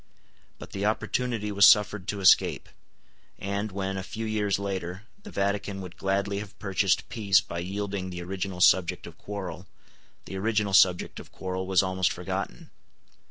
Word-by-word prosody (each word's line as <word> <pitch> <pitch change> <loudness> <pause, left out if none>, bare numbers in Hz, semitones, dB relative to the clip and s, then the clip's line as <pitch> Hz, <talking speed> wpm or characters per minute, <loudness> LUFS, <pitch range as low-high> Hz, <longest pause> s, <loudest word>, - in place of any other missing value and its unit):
But - - -11
the 100 - -4
opportunity 110 -1 -1
was 100 -1 +7
suffered 105 -2 +4
to 100 -1 -3
escape; 95 - +4 0.7
and, 100 +2 -3
when, 95 0 -3
a - - -2
few 110 +4 -5
years 105 -2 0
later, 95 -1 -4 0.2
the 205 - -10
Vatican 100 - -1
would 90 -2 -9
gladly 100 +1 -1
have 105 -1 -9
purchased 95 -1 +1
peace 100 -4 +3
by 85 - -6
yielding 95 +1 -3
the 90 -1 -6
original 95 0 -4
subject 90 -1 +4
of - - -12
quarrel, 95 -3 -6 0.6
the 95 - -6
original 105 0 0
subject 90 -2 +4
of - - -12
quarrel 95 0 -4
was 95 -1 +4
almost 95 -1 +1
forgotten. - - -5
100 Hz, 160 wpm, -27 LUFS, 95-105 Hz, 0.7 s, was